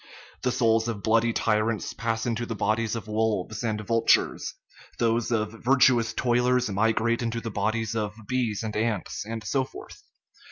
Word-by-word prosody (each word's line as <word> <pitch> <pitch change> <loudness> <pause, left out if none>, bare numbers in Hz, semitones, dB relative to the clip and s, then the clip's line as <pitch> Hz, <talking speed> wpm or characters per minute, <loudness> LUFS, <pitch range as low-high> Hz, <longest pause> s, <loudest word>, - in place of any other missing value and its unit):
The 125 - +1
souls 115 -2 +2
of 110 -4 -4
bloody 115 +1 +3
ty 110 -1 +1
rants 110 -1 -2
pass 115 -1 -2
into 120 0 -2
the 115 - -3
bodies 110 +2 0
of 115 -1 -6
wolves 110 -1 -1
and 110 -2 -1
vultures, 115 +2 +2 0.4
those 115 0 +1
of 110 -2 0
virtuous 125 -2 +4
toilers 125 -1 +2
migrate 110 +3 +1
into 115 0 -2
the 115 -1 -5
bodies 110 +2 -1
of 105 -1 -2
bees 120 -5 -1
and 110 -1 -4
ants, 110 -3 -1
and 110 -1 -5
so 135 +2 0
forth. - - -11
115 Hz, 165 wpm, -26 LUFS, 110-115 Hz, 0.4 s, virtuous